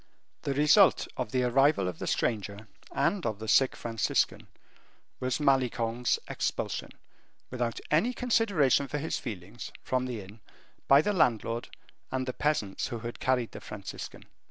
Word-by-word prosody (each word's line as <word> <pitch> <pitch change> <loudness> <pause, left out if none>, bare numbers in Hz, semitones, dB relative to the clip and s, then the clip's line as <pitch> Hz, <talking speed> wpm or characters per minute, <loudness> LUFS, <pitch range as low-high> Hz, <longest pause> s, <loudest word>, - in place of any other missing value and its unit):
The 140 - -2
result 150 +1 +5
of 105 - -3
the 130 -1 +1
arrival 130 -4 +3
of 90 -3 -5
the - - -4
stranger, 105 -1 -1 0.2
and 175 +7 +1
of 110 -3 -1
the 110 +1 -7
sick 130 +4 +4
Franciscan, 115 -2 0 0.7
was 130 +2 -1
Malicorne's 125 -4 +1
expulsion, - - -2 0.6
without 120 -2 -2
any 165 +11 +3
consideration 205 - +2
for 150 - -3
his 155 +3 -2
feelings, 105 -2 -7
from 130 0 0
the 120 -4 -4
inn, 100 +4 -13 0.5
by 140 +2 +7
the 210 - +1
landlord 115 - +1 0.4
and 130 0 -1
the 130 - -3
peasants 130 -11 -1
who 120 - -4
had 120 +1 -6
carried 125 -3 +1
the - - -9
Franciscan. - - -8
125 Hz, 150 wpm, -29 LUFS, 115-140 Hz, 0.7 s, by